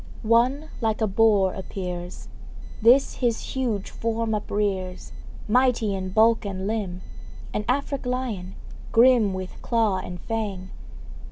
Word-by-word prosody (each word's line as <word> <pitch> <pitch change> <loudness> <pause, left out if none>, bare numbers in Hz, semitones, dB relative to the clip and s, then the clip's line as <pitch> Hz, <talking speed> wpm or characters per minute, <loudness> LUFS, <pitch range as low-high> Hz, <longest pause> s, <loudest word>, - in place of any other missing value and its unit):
One 250 +7 +2
like 220 -1 0
a 220 - +2
boar 205 -2 +3
appears; 180 -2 -6 0.5
This 250 +5 +5
his 235 -3 0
huge 235 -7 -2
form 230 0 -2
uprears, 200 -3 -2 0.4
Mighty 240 -2 +2
in 190 -1 -3
bulk 225 +4 +4
and 190 -2 -4
limb 200 -4 -3 0.5
An 210 - -1
Afric 275 0 -1
lion 230 -8 -3 0.4
grim 235 -3 +5
With 185 -1 -7
claw 225 -5 +1
and 180 -1 -6
fang. 200 -5 -4
215 Hz, 120 wpm, -25 LUFS, 190-235 Hz, 0.5 s, This